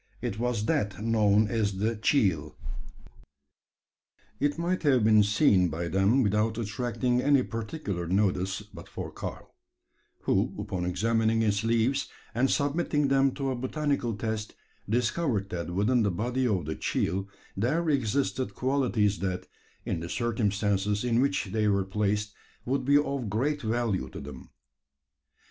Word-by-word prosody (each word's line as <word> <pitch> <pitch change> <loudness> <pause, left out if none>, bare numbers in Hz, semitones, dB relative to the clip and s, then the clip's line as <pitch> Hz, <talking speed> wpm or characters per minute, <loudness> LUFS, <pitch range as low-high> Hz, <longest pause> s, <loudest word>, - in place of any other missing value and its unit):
It 100 - -4
was 120 -3 -1
that 120 -12 0
known 110 -1 +3
as 105 -4 -1
the 110 +4 0
"cheel." 100 - +1 1.8
It 145 +2 +1
might 175 +2 -1
have 135 -7 +3
been 110 0 +6
seen 105 -3 +4
by 85 +2 -3
them 100 - +3
without 105 +1 +1
attracting 120 +2 -1
any 140 -1 +4
particular 110 - -4
notice, 95 +1 0
but 105 - -13
for - - -6
Karl; - - -7 0.7
who, - - +1
upon 90 -2 -3
examining 115 +4 +1
its 100 -1 +1
leaves, 115 +4 +1 0.3
and 125 +3 +2
submitting 145 0 +1
them 135 0 +4
to 135 -2 -1
a - - -1
botanical 130 -2 -1
test, 110 0 -4 0.3
discovered 115 - 0
that 85 -1 -4
within 105 +7 +2
the 105 - +2
body 120 +8 -1
of 95 -8 0
the 80 - -2
"cheel" 95 +5 -1 0.3
there 150 - 0
existed 135 -1 0
qualities 125 -6 +1
that, 95 -1 -2 0.4
in - - -2
the 85 +1 -6
circumstances 105 -1 0
in 120 0 +2
which 140 -6 0
they 110 0 +1
were 100 -2 +2
placed, 105 +1 -1 0.3
would 130 +1 -1
be 140 +1 +5
of 140 -6 -1
great 140 +8 0
value 115 -3 -1
to - - -8
them. 70 -2 -10
110 Hz, 145 wpm, -28 LUFS, 100-130 Hz, 1.8 s, been